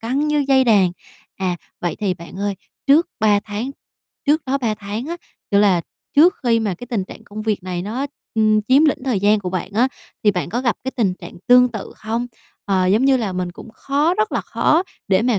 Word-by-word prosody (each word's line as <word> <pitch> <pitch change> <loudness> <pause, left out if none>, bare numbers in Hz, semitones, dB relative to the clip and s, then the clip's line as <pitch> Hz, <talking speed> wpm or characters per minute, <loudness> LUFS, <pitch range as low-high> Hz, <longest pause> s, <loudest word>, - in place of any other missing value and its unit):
căng 270 +6 -1
như 295 -1 +2
dây 265 -1 +5
đàn. 195 -6 +4 0.4
À, 185 -2 -1 0.2
vậy 175 - -2
thì 195 -4 0
bạn 170 +1 -11
ơi, 200 0 -1 0.3
trước 300 +5 +5
3 205 -2 +4
tháng 215 +5 -4 0.6
trước 310 +2 +3
đó 275 +2 +1
3 230 -5 0
tháng 210 +6 -5
á, 340 - -4 0.3
kiểu 200 0 +4
là 190 -4 +4 0.4
trước 340 +6 +7
khi 230 -2 +3
mà 205 -4 -1
cái 245 - -10
tình 225 -6 -2
trạng 220 - -12
công 215 -1 -7
việc 210 -4 -1
này 180 -1 -4
nó, 245 +8 -3 0.3
ưm, 215 -1 +3
chiếm 270 +7 +4
lĩnh 295 - +1
thời 235 -8 0
gian 205 +1 +3
của 185 - -4
bạn 185 +1 -3
á, 245 +4 +3 0.4
thì 210 - +6
bạn 180 -6 -3
có 240 +7 -2
gặp 240 -4 +1
cái 265 - -1
tình 200 -6 +1
trạng - - -11
tương 250 0 +7
tự 215 -4 -6
không? 230 +3 -3 0.4
Ờ, 190 -2 +1
giống 210 +8 +3
như 275 -1 +5
là 215 -6 -2
mình 180 -1 -3
cũng 225 - -11
khó 290 +8 +1
rất 430 +2 0
là - - +1
khó 325 +4 +2 0.3
để 190 +2 +3
mà 240 -3 +2
220 Hz, 230 wpm, -20 LUFS, 195-260 Hz, 0.6 s, trước